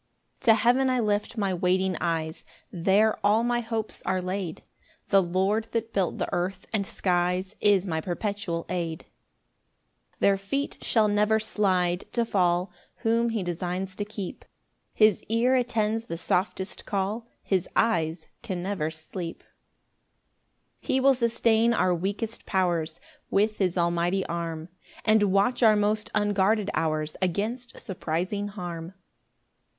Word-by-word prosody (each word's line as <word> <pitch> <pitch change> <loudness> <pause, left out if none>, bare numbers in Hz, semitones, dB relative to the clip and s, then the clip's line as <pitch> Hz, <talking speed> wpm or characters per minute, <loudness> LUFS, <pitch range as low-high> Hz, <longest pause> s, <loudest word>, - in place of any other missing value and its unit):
1 - - -9
To 225 - +8
heaven 245 +4 +3
I 255 -1 +2
lift 210 +1 0
my 200 -3 0
waiting 185 +1 +1
eyes, 160 -1 -2 0.3
There 200 +5 +2
all 210 +3 +4
my 240 0 +1
hopes 225 -2 -4
are 190 -1 0
laid: 180 -2 -4 0.5
The 195 -1 +6
Lord 190 +5 +1
that 230 0 -2
built 190 -4 0
the - - -1
earth 185 +2 -2
and 200 -3 0
skies 180 +1 0
Is 200 -2 +4
my 160 -4 -1
perpetual 180 -1 -3
aid. 170 -3 -3 1.1
2 - - -35
Their 200 -1 +4
feet 275 +9 -3
shall 220 -2 +3
never 210 +1 +3
slide 185 -4 0
to 235 -1 +1
fall 180 -3 +1 0.3
Whom 230 +1 +2
he 225 -4 -1
designs 180 +2 -3
to 205 - -1
keep; 205 -3 -6 0.5
His 215 -2 +4
ear 235 +3 +3
attends 225 -3 +1
the 165 - -5
softest 185 +2 -2
call, 205 +4 -2 0.2
His 190 -3 0
eyes 165 -7 +1 0.2
can 185 -7 -4
never 185 -5 -1
sleep. 165 +2 -7 1.4
3 - - -2
He - - +4
will 270 +1 +5
sustain 235 -1 +2
our 185 -4 +3
weakest 200 +6 -3
powers 175 -4 0 0.3
With 215 +2 +1
his 185 -2 +1
almighty 175 +2 +1
arm, 165 -1 -4 0.4
And 215 0 +5
watch 205 +5 +2
our 220 -2 +6
most 210 +1 +1
unguarded 205 0 +2
hours 155 -1 -1
Against 220 +7 -2
surprising 185 +3 -2
harm. 175 -3 -6
195 Hz, 140 wpm, -27 LUFS, 175-220 Hz, 1.4 s, To